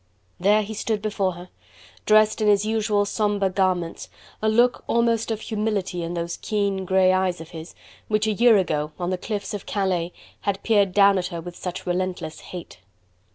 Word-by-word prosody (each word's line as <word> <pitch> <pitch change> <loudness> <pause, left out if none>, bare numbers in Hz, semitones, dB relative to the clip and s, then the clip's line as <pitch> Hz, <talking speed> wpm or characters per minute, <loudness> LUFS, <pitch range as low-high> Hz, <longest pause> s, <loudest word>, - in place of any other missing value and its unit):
There 205 +4 +4
he 215 +2 -6
stood 215 0 -1
before 205 -3 -1
her, 175 +1 -11 0.6
dressed 215 +1 +4
in 215 - +2
his 205 0 +4
usual 215 -2 +1
somber 205 -2 0
garments, 185 -3 -1 0.3
a 215 - +2
look 240 +3 +3
almost 230 -1 +1
of 220 -1 -2
humility 210 -5 -2
in 170 +1 -4
those 170 0 -3
keen 200 -3 -1
grey 185 0 +4
eyes 185 -1 0
of 165 0 -10
his, 160 0 -9 0.3
which 215 0 +1
a 220 - +1
year 225 +1 +5
ago 150 -5 -1
on 175 0 -2
the 185 - 0
cliffs 210 0 -4
of 205 - -6
Calais 185 -4 -1 0.3
had 200 -1 -2
peered 205 -4 +3
down 200 -1 +5
at 180 - -2
her 170 -2 -6
with 175 +1 -8
such 180 0 -6
relentless 180 -3 -3
hate. 175 - -10
195 Hz, 185 wpm, -24 LUFS, 180-215 Hz, 0.6 s, year